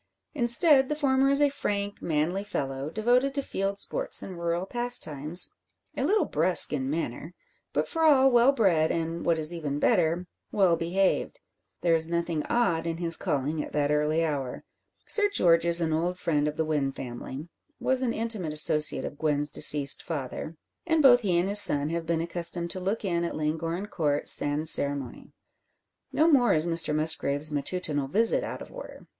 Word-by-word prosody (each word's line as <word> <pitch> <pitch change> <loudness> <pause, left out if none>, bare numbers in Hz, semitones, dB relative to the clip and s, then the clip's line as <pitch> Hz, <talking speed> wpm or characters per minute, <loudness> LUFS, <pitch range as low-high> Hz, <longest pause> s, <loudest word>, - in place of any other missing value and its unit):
Instead, 265 +2 +3
the 300 - -2
former 270 -2 +1
is 280 +1 +3
a 290 - +3
frank, 205 -7 -4
manly 165 +5 -2
fellow, 135 -8 -5
devoted 245 - 0
to 280 - -2
field 195 -3 -4
sports - - +1
and 185 -3 -9
rural 170 +1 -3
pastimes, 175 - 0 0.4
a - - -3
little 420 +1 +1
brusque 165 +1 +4
in 135 -2 -3
manner, 155 +2 -5 0.4
but - - -2
for 325 - -4
all 270 -4 +4
well 245 +2 +4
bred, 180 - +1
and, 165 0 -4
what 165 -1 +2
is 155 +2 0
even 150 -4 -5
better, 175 -1 0 0.3
well 190 -4 +2
behaved. 180 +4 -2 0.4
There 170 -1 +1
is 160 0 +1
nothing 170 -2 -3
odd 170 -9 -1
in 165 -1 -4
his 165 -1 +2
calling 150 +2 -3
at - - -11
that 145 -1 -1
early 150 +2 0
hour. 140 -5 -5 0.4
Sir 410 -1 +3
George 170 - +2
is 170 0 +2
an 160 -2 -2
old 175 +3 -2
friend 150 -5 -1
of 150 - -5
the 160 - -1
Wynn 145 -3 -2
family 130 +4 -9 0.3
was 260 0 0
an 250 -3 -1
intimate 220 -9 -3
associate 150 0 +3
of 145 - -9
Gwen's 150 -2 +3
deceased 145 -2 +4
father 155 +1 -7 0.3
and 320 -2 +1
both 245 -2 +6
he 185 -6 0
and 175 +2 0
his 205 +1 +7
son 145 -4 +1
have 165 -1 -5
been 165 -1 -1
accustomed 170 0 0
to 185 - -2
look 195 +4 -4
in 170 -2 -2
at 170 - -4
Llangorren 165 +4 -4
Court 150 -7 -3
sans 145 +2 +4
ceremonie. 140 -3 -2 0.8
No 315 - +1
more 265 - +3
is 155 +1 0
Mr 165 -3 0
Musgrave's 155 -1 +1
matutinal 145 -1 -2
visit 225 +10 +1
out - - -7
of - - -16
order. - - -12
170 Hz, 180 wpm, -26 LUFS, 150-210 Hz, 0.8 s, his